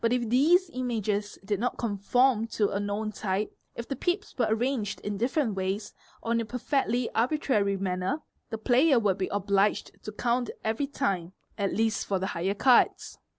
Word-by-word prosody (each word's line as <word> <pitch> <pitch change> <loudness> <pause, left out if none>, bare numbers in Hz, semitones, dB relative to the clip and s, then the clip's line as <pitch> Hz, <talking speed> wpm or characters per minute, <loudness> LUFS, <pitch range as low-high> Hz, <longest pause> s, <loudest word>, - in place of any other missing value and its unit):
If 235 0 +1
these 330 - +4
images 215 -5 -2
did 205 -1 -1
not 245 +2 -1
conform 230 +2 +2
to 205 -2 +2
a 200 - -1
known 205 +1 -2
type, 200 0 -2 0.2
if 235 - -6
the 275 - -3
pips 355 - -2
were 240 -4 +1
arranged 225 -1 -1
in 205 -1 -4
different 245 0 +1
ways 195 +2 -3 0.3
or 230 - -2
in 230 0 +2
a - - -3
perfectly 250 0 0
arbitrary 225 -5 +1
manner, 190 +9 -2 0.3
the 225 - -3
player 260 +5 +4
would 200 -4 +1
be 185 - 0
obliged 200 0 +1
to 215 - -5
count 240 +3 0
" - - -38
every 225 +6 -1
time, 190 - -2 0.2
at 200 -1 -1
least 225 0 0
for 195 - +1
the 185 - -2
high 180 +4 -1
cards. 250 +3 +3
220 Hz, 180 wpm, -28 LUFS, 200-250 Hz, 0.3 s, these